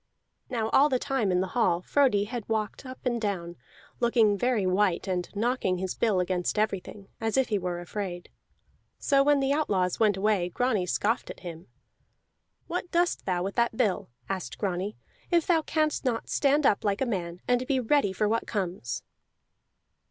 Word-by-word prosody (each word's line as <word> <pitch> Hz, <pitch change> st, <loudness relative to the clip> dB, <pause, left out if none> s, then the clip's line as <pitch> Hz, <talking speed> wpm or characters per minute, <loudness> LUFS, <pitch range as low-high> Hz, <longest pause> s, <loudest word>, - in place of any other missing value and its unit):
Now 225 Hz, -4 st, -1 dB
all 285 Hz, +5 st, +5 dB
the 260 Hz, -, +2 dB
time 255 Hz, -7 st, 0 dB
in 180 Hz, 0 st, +2 dB
the 190 Hz, -, -2 dB
hall 185 Hz, -8 st, +2 dB
Frodi 255 Hz, -7 st, +3 dB
had 230 Hz, 0 st, -6 dB
walked 220 Hz, +3 st, -2 dB
up 255 Hz, 0 st, -8 dB
and 240 Hz, -2 st, 0 dB
down, 175 Hz, -5 st, -3 dB, 0.4 s
looking 235 Hz, -3 st, +3 dB
very 230 Hz, -1 st, +1 dB
white 185 Hz, 0 st, +1 dB
and 180 Hz, -2 st, -2 dB
knocking 220 Hz, -4 st, 0 dB
his 185 Hz, 0 st, -3 dB
bill 215 Hz, -5 st, +1 dB
against 180 Hz, +2 st, -1 dB
everything, 200 Hz, -1 st, -2 dB
as 225 Hz, +2 st, 0 dB
if 265 Hz, -2 st, +2 dB
he 210 Hz, -2 st, +1 dB
were 180 Hz, -1 st, -3 dB
afraid. 175 Hz, 0 st, -5 dB, 0.7 s
So 275 Hz, -1 st, +3 dB
when 290 Hz, 0 st, +4 dB
the 270 Hz, 0 st, +2 dB
outlaws 190 Hz, -, 0 dB
went 210 Hz, -3 st, +3 dB
away, 195 Hz, -3 st, +1 dB
Grani 215 Hz, -2 st, 0 dB
scoffed 220 Hz, +6 st, 0 dB
at -, -, -9 dB
him. 170 Hz, -2 st, -8 dB, 1.0 s
"What 355 Hz, +1 st, -4 dB
dost 345 Hz, 0 st, 0 dB
thou 180 Hz, -1 st, 0 dB
with 195 Hz, +1 st, -3 dB
that 235 Hz, -1 st, +1 dB
bill," 210 Hz, -, 0 dB, 0.2 s
asked 190 Hz, -2 st, -4 dB
Grani, 195 Hz, +1 st, -2 dB, 0.3 s
"if 340 Hz, -2 st, +3 dB
thou 330 Hz, -3 st, +3 dB
canst 310 Hz, -1 st, 0 dB
not 240 Hz, -4 st, -1 dB
stand 285 Hz, +1 st, +2 dB
up 200 Hz, -, +3 dB
like 200 Hz, +1 st, 0 dB
a -, -, +3 dB
man, 180 Hz, -7 st, -3 dB
and 245 Hz, +1 st, +1 dB
be 270 Hz, -2 st, +2 dB
ready 255 Hz, -3 st, +2 dB
for 210 Hz, +3 st, 0 dB
what 225 Hz, +2 st, 0 dB
comes?" 180 Hz, -, -3 dB
210 Hz, 180 wpm, -28 LUFS, 185-255 Hz, 1.0 s, all